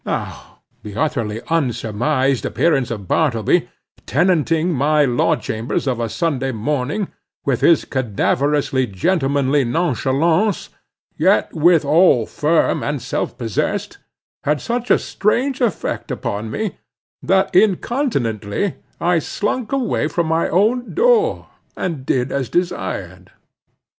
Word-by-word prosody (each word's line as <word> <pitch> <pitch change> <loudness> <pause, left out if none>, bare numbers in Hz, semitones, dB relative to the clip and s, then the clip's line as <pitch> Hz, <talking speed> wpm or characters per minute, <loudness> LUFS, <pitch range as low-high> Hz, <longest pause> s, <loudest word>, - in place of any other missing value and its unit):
Now, - - -5 0.2
the 105 -2 -9
utterly 115 -6 -1
unsurmised 130 -2 0
appearance 140 -7 +1
of 105 -5 -6
Bartleby, 115 - +1 0.4
tenanting 165 +1 +2
my 150 +2 +3
law 125 -2 +2
chambers 110 +5 -3
of 130 -3 -1
a 115 -1 -2
Sunday 135 -3 -1
morning, 145 - -2 0.4
with 135 -4 0
his 170 - +4
cadaverously 130 +2 0
gentlemanly 140 - +1
nonchalance, 160 - +1 0.5
yet - - +3
withal 160 -5 +4
firm 155 +7 +1
and 145 -1 -2
self - - -3
possessed, 115 -5 -2 0.4
had 150 0 +1
such 240 - -3
a - - +6
strange 255 +6 -1
effect 235 -4 -1
upon 105 +2 -3
me, 215 - -3 0.4
that 190 0 +1
incontinently 185 - 0 0.2
I 175 0 +2
slunk 210 - -3
away 260 - 0
from 170 +1 -1
my 160 +1 +1
own 225 +7 +1
door, 470 +1 +2 0.3
and 155 -8 -4
did 130 0 0
as 135 -3 -2
desired. 95 - -3
150 Hz, 115 wpm, -19 LUFS, 125-180 Hz, 0.5 s, a